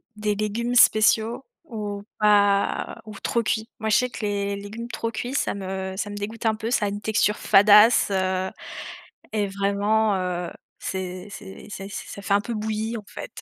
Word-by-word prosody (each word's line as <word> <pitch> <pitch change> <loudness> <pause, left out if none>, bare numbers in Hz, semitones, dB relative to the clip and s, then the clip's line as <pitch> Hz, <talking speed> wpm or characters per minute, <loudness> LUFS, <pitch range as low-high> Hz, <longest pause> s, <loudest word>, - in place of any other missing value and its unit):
des 210 -1 -1
légumes 225 +4 -2
spéciaux, 225 +2 +4 0.2
ou 205 -6 -5 0.2
pas 205 -1 +2
ou 215 -2 -9
trop 235 - 0
cuits. 220 +1 -1
Moi, 220 0 -2
je 215 - +4
sais 250 - +1
que 240 - -8
les 200 -1 -1
les 200 - -7
légumes 220 +4 -7
trop 230 -1 -3
cuits, 245 +3 -4
ça 280 - 0
me 190 -1 -4
ça 205 +1 -2
me 205 - -6
dégoûte 215 +3 -6
un 220 - +3
peu, 220 +2 -4
ça 210 - +2
a - - 0
une 205 +1 -5
texture 210 0 +2
fadasse, 210 +4 +6
heu 185 0 0 0.8
et 210 -2 +1
vraiment, 200 +2 +1
heu, 180 -2 -2 0.3
c'est 185 0 -5
c'est 200 0 -10
c'est 195 -1 -7
ça 200 - -7
fait 200 - 0
un 200 - +4
peu 235 +3 -5
bouilli, 220 +1 -2
en 215 - -8
fait. - - -8
210 Hz, 190 wpm, -24 LUFS, 200-220 Hz, 0.8 s, fadasse